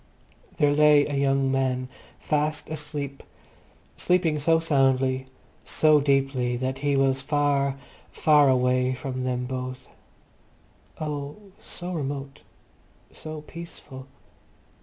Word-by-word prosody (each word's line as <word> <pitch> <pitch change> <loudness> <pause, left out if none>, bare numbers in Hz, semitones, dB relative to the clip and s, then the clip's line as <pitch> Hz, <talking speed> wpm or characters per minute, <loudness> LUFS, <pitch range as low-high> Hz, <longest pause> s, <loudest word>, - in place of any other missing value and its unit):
There 145 -1 +3
lay 150 -1 +5
a 145 - -4
young 135 -1 +1
man, 130 -1 0 0.3
fast 150 0 -1
asleep—sleeping 150 +3 -3
so 165 +3 +3
soundly, 135 -4 +1 0.4
so 155 -1 +4
deeply, 135 -3 +1
that 130 +1 -3
he 145 0 +1
was 135 0 +2
far, 140 -1 +1 0.3
far 150 -2 +4
away 125 0 +2
from 130 0 -4
them 125 -1 -1
both. 130 0 -5 1.1
Oh, 145 -2 -4 0.2
so 180 +1 -6
remote, 140 -3 -5 0.7
so 155 -1 -8
peaceful. 150 -5 -10
140 Hz, 100 wpm, -25 LUFS, 130-150 Hz, 1.1 s, lay